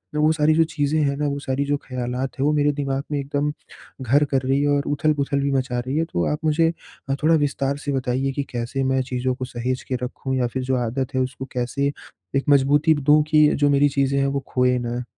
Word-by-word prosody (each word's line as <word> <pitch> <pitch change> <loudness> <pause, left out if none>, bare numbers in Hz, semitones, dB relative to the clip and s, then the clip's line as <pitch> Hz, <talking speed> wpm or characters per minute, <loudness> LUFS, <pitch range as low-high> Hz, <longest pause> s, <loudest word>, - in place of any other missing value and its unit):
वो 150 +1 +3
सारी 155 0 +3
जो 165 - +5
चीज़ें 155 -1 -1
हैं 140 -1 +1
ना, 150 - 0
वो 140 0 -2
सारी 140 0 -2
जो 145 0 0
ख़्यालात 125 +1 -4
है, 135 - +1
वो 150 - +3
मेरे 145 0 +3
दिमाग़ 140 -1 -2
में 145 - 0
एकदम 145 +1 -1 0.5
घर 140 +4 +3
कर 135 - +2
रही 135 +2 +1
है 145 - +1
और 145 0 +2
उथल-पुथल 145 -1 0
भी 140 0 0
मचा 130 -2 -1
रही 130 +4 -3
है। 165 - +1
तो 85 - +1
आप 150 - -2
मुझे 165 +1 +3 0.5
थोड़ा 165 +1 +5
विस्तार 140 -2 0
से 145 0 -4
बताइए 135 0 -1
कि 140 +1 -2
कैसे 120 +3 -3
मैं 130 0 +1
चीज़ों 125 0 -1
को 130 0 -5
सहेज 125 +1 -3
के 130 - 0
रखूँ 130 +1 -4
या 125 - +1
फ़िर 130 +2 -4
जो 130 +1 0
आदत 130 +3 -3
है 130 - +2
उसको 130 +1 -4
कैसे 125 +3 -1 0.4
एक 135 - +2
मज़बूती 145 +3 +4
दूँ 150 +1 +4
कि 150 -1 +6
जो 145 0 +2
मेरी 145 +1 +4
चीज़ें 140 0 +1
हैं 135 - +2
वो 140 0 -1
खोएँ 125 0 +2
ना? 120 +1 -3
140 Hz, 235 wpm, -22 LUFS, 130-145 Hz, 0.5 s, कि